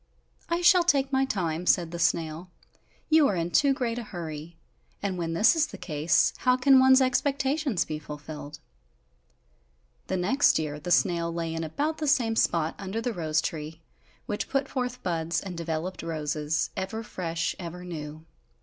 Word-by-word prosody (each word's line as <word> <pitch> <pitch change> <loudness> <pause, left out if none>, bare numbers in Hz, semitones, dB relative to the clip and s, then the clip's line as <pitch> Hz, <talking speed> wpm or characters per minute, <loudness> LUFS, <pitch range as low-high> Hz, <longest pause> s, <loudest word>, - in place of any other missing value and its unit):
"I 340 +1 0
shall 350 0 +6
take 275 -5 +2
my 265 0 +3
time," 175 -7 -2
said 170 -3 +3
the 170 - -5
snail, 165 +1 0 0.6
"you 310 -2 +6
are 200 - 0
in 170 0 -2
too 275 - +4
great 245 -3 -1
a - - -5
hurry, 165 -4 -7 0.4
and 200 -2 -2
when 165 -2 -3
this 210 - +5
is 315 -2 +2
the - - -10
case, 160 0 +1
how 250 0 +2
can 265 +1 +6
one's 260 0 +6
expectations 270 - +1
be 155 -1 -4
fulfilled?" 150 0 -8 1.5
The 190 - -1
next 235 +11 +3
year 150 -2 -3
the 170 +4 -6
snail 170 -2 +2
lay 165 -1 -3
in 165 0 -3
about 290 - -2
the 305 - -2
same 235 -5 +2
spot 165 -6 +1
under 200 +2 -4
the 240 +1 -2
rose 155 -4 0
tree, 155 +1 -5 0.5
which 205 - -3
put 275 0 0
forth 250 -1 -4
buds 170 -1 -1
and 185 -1 -7
developed 170 +2 -4
roses, 155 -1 -2
ever 195 +4 -4
fresh, 170 -5 -3
ever 180 0 -7
new. 155 -2 -7
175 Hz, 170 wpm, -27 LUFS, 160-255 Hz, 1.5 s, shall